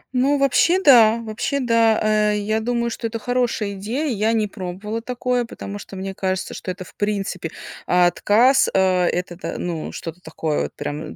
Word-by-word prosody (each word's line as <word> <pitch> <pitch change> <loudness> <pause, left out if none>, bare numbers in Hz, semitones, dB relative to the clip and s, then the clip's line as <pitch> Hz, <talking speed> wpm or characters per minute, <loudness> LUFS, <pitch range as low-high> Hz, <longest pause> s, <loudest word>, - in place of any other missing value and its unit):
Ну, 275 +3 +3
вообще 275 +6 +3
да, 235 - +6
вообще 225 +5 -2
да, 230 -3 +3 0.3
э, 210 - 0
я 215 +2 -1
думаю, 235 +1 -1
что 230 - -3
это 230 0 -4
хорошая 240 -3 -1
идея. 220 +10 -3
Я 215 +2 +1
не 220 -2 +1
пробовала 200 +3 -5
такое, 250 0 -1
потому 205 -3 -8
что 200 - -10
мне 190 0 -5
кажется, 190 -1 -2
что - - -7
это, 185 +1 -5
в - - -16
принципе, 195 -5 -2 0.4
отказ. 205 +8 +4
Э, 185 -1 +3
это 175 0 -2
то-то, 180 - -6
ну, 170 -3 -4
что-то 165 +2 -8
такое 160 -2 -2
вот - - -6
прям. 150 +2 -5
215 Hz, 180 wpm, -21 LUFS, 185-240 Hz, 0.4 s, да